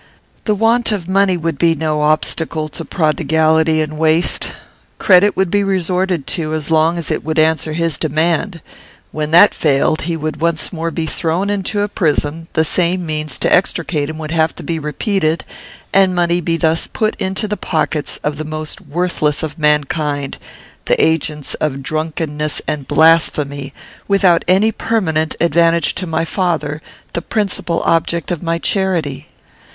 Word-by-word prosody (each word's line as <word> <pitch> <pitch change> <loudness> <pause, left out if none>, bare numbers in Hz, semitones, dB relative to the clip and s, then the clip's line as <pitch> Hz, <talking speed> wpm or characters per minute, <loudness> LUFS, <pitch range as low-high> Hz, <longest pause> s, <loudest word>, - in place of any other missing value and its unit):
The 215 - +2
want 225 +3 +2
of 190 -5 -3
money 190 -1 +2
would 165 -3 -3
be 165 -1 +3
no 155 -1 -1
obstacle 155 +1 0
to 165 - -7
prodigality 160 0 +2
and 155 0 -6
waste. 160 +2 +1 0.4
Credit 190 +2 +4
would 190 -3 +1
be 205 0 +2
resorted 185 -4 0
to 155 -2 -2
as 155 +1 -3
long 160 +2 +3
as 170 - -3
it - - -2
would 160 +1 -3
answer 155 0 +2
his 165 -1 -1
demand. 165 +3 0 0.5
When 150 -1 -3
that 175 +6 +7
failed, 150 +1 +1
he 165 +1 -2
would 155 -1 -4
once 170 +2 0
more 165 0 -2
be 165 -1 -3
thrown 170 +5 -1
into 205 +1 -1
a 205 - +1
prison; 160 -3 -1
the 160 - +3
same 180 +2 0
means 155 -3 -3
to - - +2
extricate 165 -5 0
him 155 - -6
would 155 -1 -6
have 160 -1 +1
to - - -8
be 165 -1 -2
repeated, 160 +2 -1 0.5
and 190 -1 +4
money 175 0 +1
be 165 0 0
thus 165 0 +1
put 215 0 -1
into 190 +3 -2
the 210 - -2
pockets 155 -5 -1
of 150 -1 -2
the 155 - -4
most 155 +1 -5
worthless 160 -2 -1
of 155 +1 -5
mankind, 150 -1 0 0.5
the - - +1
agents 155 -2 0
of 140 -3 -2
drunkenness 155 0 -2
and 145 -3 -3
blasphemy, 150 -4 +2 0.4
without 190 -4 +3
any 195 +5 +4
permanent 160 -10 -1
advantage 170 0 +2
to 185 - -4
my 165 0 -1
father, 160 -4 -2 0.3
the 170 - -2
principal 195 -6 -2
object 165 0 0
of 175 - -2
my 165 -1 -1
charity. 170 -7 -1
165 Hz, 165 wpm, -17 LUFS, 155-180 Hz, 0.5 s, that